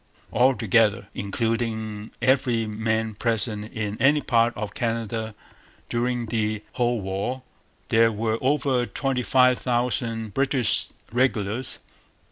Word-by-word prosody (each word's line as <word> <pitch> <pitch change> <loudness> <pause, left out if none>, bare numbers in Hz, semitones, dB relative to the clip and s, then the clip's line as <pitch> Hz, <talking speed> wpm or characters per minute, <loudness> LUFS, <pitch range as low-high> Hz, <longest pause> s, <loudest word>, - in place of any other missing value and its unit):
Altogether, 115 -5 +3
including 110 0 -2
every 130 -4 +2
man 110 +1 -1
present 110 -1 -1
in 105 -1 -4
any 145 +3 +5
part 115 -4 +2
of 105 -1 -4
Canada 115 -2 -2 0.5
during 120 0 0
the 110 -2 -1
whole 120 -1 +1
war, 100 +7 -3 0.5
there 115 0 +5
were 110 +1 -1
over 130 -2 +1
twenty 130 +4 -1
five 125 0 +4
thousand 120 -3 -1
British 135 -2 +2 0.2
regulars. 120 -1 0
115 Hz, 105 wpm, -25 LUFS, 110-125 Hz, 0.5 s, any